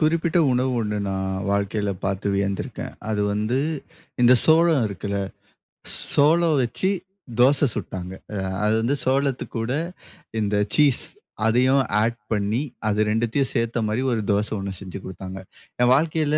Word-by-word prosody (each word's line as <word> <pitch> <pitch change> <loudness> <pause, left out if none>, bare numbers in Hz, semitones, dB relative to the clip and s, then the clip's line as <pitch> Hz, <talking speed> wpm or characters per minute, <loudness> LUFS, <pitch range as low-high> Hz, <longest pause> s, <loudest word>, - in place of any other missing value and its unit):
குறிப்பிட்ட 165 +2 +2
உணவு 130 +1 +1
ஒண்ணு, 105 -1 -2
நான் 95 0 -2 0.2
வாழ்க்கைல 100 +1 0
பாத்து 95 +1 -2
வியந்திருக்கேன். 100 0 -2 0.2
அது 105 -1 0
வந்து 110 +5 0 0.6
இந்த 120 +1 +7
சோளம் 160 -4 +5
இருக்குல்ல? 100 +1 -3 1.0
சோளம் 160 +2 +4
வச்சு 125 +10 -1 0.5
தோச 140 +3 +5
சுட்டாங்க. 90 0 -5 0.2
அ - - -3 0.3
அது 105 - +3
வந்து 130 +5 +1
சோளத்து 135 0 +1
கூட, 115 +2 -2 0.7
இந்த 105 -1 0 0.2
சீஸ் 145 -4 +4 0.4
அதயும் 130 +4 +4 0.2
ஆட் 115 +1 0
பண்ணி 105 +3 +1 0.3
அது 105 0 +1
2த்தையும் 115 +5 0
சேத்த 115 -1 0
மாரி 110 +4 0
ஒரு 115 -2 0
தோச 105 +1 +1
ஒன்னு 100 0 -4
செஞ்சு 95 -1 -7
கொடுத்தாங்க. 95 0 -7 0.4
என் 125 - +5
வாழ்க்கைல 155 0 +1
115 Hz, 135 wpm, -23 LUFS, 100-140 Hz, 1.0 s, இந்த